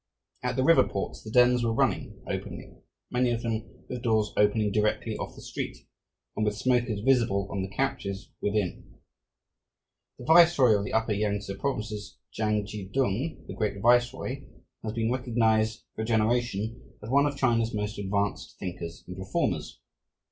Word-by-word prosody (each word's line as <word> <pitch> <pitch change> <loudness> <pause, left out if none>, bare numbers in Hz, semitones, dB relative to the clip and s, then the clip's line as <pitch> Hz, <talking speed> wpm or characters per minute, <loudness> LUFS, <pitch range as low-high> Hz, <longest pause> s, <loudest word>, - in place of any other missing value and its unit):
At 125 0 -1
the 130 - +1
river 165 +3 +6
ports 100 - -4
the 110 - -9
dens 125 +1 +5
were 115 -1 +1
running - - 0
openly, - - -5 0.4
many 125 0 +2
of 120 -1 -1
them 115 -1 -4
with 125 -1 -5
doors 110 -3 +1
opening 105 0 +3
directly 105 +1 0
off - - -6
the - - -12
street - - -5 0.6
and 110 - 0
with 105 -1 0
smokers 120 -4 +1
visible 115 -6 +2
on 100 - -2
the 95 - -3
couches 100 -4 -3
within. 105 -3 -2 1.2
The 125 - -10
viceroy 160 -7 +6
of 100 0 0
the - - -5
upper 110 0 +1
Yangtse 100 -1 -1
provinces, 110 -7 -3
Chang 105 -1 0
chi 100 -2 -7
tung, 130 +4 -1
"the - - -6
Great 105 -2 -2
Viceroy," 120 +2 +2 0.4
has 110 -1 -4
been 115 0 0
recognized 115 -3 +1
for - - -5
a - - 0
generation 115 -1 0
as 110 - -6
one 140 +2 +5
of 140 -1 -3
China's 115 -4 +2
most 105 0 -3
advanced 100 0 -2
thinkers 85 -2 -6
and 90 +1 -8
reformers. 95 - -2
110 Hz, 160 wpm, -28 LUFS, 105-125 Hz, 1.2 s, river